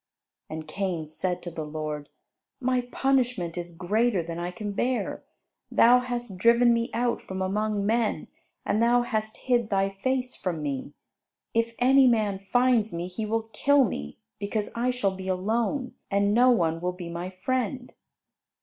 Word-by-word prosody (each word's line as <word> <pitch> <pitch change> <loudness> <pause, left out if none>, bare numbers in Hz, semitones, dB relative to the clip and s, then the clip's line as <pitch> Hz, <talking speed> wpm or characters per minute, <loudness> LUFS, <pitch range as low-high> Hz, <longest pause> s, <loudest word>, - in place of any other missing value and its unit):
And 155 0 -6
Cain 175 -1 -2
said 180 +3 -3
to 175 - -5
the 160 -1 -5
Lord, 150 -1 -5 0.5
"My 255 0 +1
punishment 250 -10 +1
is 175 -1 -4
greater 205 +2 +1
than 165 +1 -5
I 175 +1 -2
can 205 +2 -5
bear. 245 +5 -1 0.5
Thou 245 +2 +6
hast 240 -6 -4
driven 235 +3 +5
me 230 0 0
out 240 0 0
from 190 0 -6
among 205 +2 0
men; 225 +1 0 0.4
and 215 - +1
thou 240 +1 +4
hast 220 -2 -2
hid 240 -4 +1
thy 195 -1 +2
face 255 +5 -2
from 170 -5 -3
me. 140 0 -4 0.6
If 230 0 0
any 265 +1 +6
man 215 -5 +2
finds 235 +1 +2
me 170 +1 -3
he 215 +4 -4
will 225 +1 -2
kill 285 -1 +4
me, 75 - -4 0.2
because 205 +1 -2
I 240 +2 0
shall 210 -7 0
be 190 0 -7
alone, 225 +8 -1 0.2
and 200 0 +2
no 245 +3 +6
one 165 -8 +2
will 180 +1 -1
be 180 -1 -7
my 170 +2 -4
friend." 250 +6 -2
215 Hz, 165 wpm, -27 LUFS, 180-240 Hz, 0.6 s, Thou